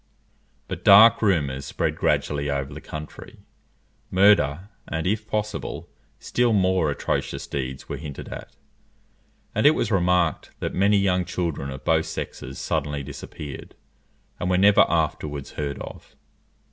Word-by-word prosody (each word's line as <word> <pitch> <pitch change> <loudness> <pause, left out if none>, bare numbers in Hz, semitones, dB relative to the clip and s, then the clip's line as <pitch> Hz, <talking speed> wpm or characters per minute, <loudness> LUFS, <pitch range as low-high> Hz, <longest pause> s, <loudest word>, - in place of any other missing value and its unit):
But - - -6
dark 105 +4 +8
rumours 75 -10 +1
spread - - -2
gradually 70 -1 0
over 70 0 -2
the 75 - -8
country; 75 0 -9 0.7
murder, 95 -3 +3 0.2
and, 80 0 -3
if 110 +3 -1
possible, 105 0 -3 0.3
still 120 -1 +1
more 95 -5 +2
atrocious 70 - -2
deeds 65 -1 -5
were 70 - -4
hinted 75 0 -8
at; - - -9 1.0
and - - +4
it 155 - +6
was - - -1
remarked 90 -4 +1
that - - -3
many 100 +2 +3
young 90 -2 +2
children 85 -6 -3
of 65 0 -8
both - - +2
sexes 65 +2 -6
suddenly 75 -1 -2
disappeared, 70 +1 -9 0.6
and 90 - -1
were 90 - +3
never 100 +2 +6
afterwards 75 -2 -2
heard 70 -2 -4
of. - - -10
80 Hz, 135 wpm, -24 LUFS, 70-100 Hz, 1.0 s, dark